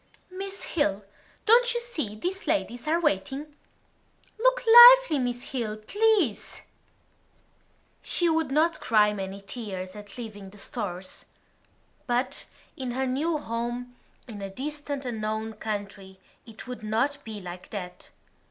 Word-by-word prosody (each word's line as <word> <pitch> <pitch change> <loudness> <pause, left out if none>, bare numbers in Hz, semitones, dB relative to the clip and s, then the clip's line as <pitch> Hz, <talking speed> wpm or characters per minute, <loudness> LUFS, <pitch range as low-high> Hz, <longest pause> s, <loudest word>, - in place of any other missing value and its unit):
"Miss 390 +1 -5
Hill, 205 - 0 0.4
don't 480 +2 +5
you - - +1
see 310 - -3
these 370 - -4
ladies 245 -5 -1
are 330 +2 +2
waiting?" 285 - -1 0.8
"Look - - +3
lively, 480 - +9
Miss 245 -1 -3
Hill, 225 -5 -3
please." 395 - 0 1.4
She 345 - +1
would 320 -3 +1
not 315 +5 +2
cry 210 -2 +3
many 195 0 -6
tears 195 -3 -6
at 205 +1 -11
leaving 210 -5 -8
the 205 - -15
Stores. 190 -4 -6 0.8
But 245 +1 -1 0.3
in 255 -2 -4
her 265 +1 -1
new 300 +6 0
home, 240 -1 -4 0.3
in 210 -4 -8
a 195 - -5
distant 285 +4 -5
unknown 220 -1 -3
country, 200 -3 -6 0.3
it 225 -1 -11
would 250 -2 -7
not 260 +7 -1
be 220 -2 -7
like 180 -1 -9
that. 180 -4 -7
245 Hz, 130 wpm, -27 LUFS, 210-310 Hz, 1.4 s, lively